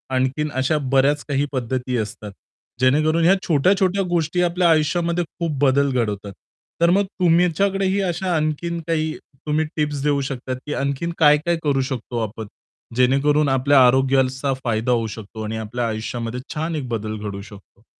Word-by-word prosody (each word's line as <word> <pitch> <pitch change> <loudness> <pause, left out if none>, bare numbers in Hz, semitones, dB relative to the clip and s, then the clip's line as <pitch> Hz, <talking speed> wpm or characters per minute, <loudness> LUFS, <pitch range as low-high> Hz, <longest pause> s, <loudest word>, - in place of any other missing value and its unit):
आणखीन 130 +4 0
अशा 145 +4 +1 0.2
बऱ्याच 140 +2 +3
काही 140 0 +1
पद्धती 125 0 -2
असतात, 105 -1 -5 0.5
जेणेकरून 155 +6 +3
ह्या 185 +3 +6
छोट्या-छोट्या 190 +5 +2
गोष्टी 170 0 0
आपल्या 175 0 +2
आयुष्यामध्ये 170 +2 +1 0.2
खूप 165 -4 -2
बदल 140 +1 +3
घडवतात. 105 -5 -2 0.5
तर 170 - +5
मग 200 +3 +3 0.2
तुमच्याकडेही 190 +3 +2
अशा 180 +1 -2
आणखीन 155 +2 -1
काही 160 -1 0 0.3
तुम्ही 155 +1 +1
टिप्स 150 -2 -1
देऊ 145 -1 +1
शकतात 130 -1 -4
की 150 - -3
आणखीन 140 +5 -2
काय-काय 155 +3 +4
करू 140 -3 +1
शकतो 120 -2 -4
आपण, 110 +1 -8 0.5
जेणेकरून 140 +4 +3
आपल्या 135 0 +5
आरोग्याचा 130 +1 +2
फायदा 115 0 0
होऊ 115 -2 +1
शकतो 110 0 -8
आणि 110 +1 -4
आपल्या 115 +2 -3
आयुष्यामध्ये 115 +2 -4
छान 160 +2 -3
एक 135 -5 -4
बदल 110 -2 -3
घडू 105 -1 -6
शकतो. 100 +1 -15
140 Hz, 150 wpm, -21 LUFS, 125-165 Hz, 0.5 s, ह्या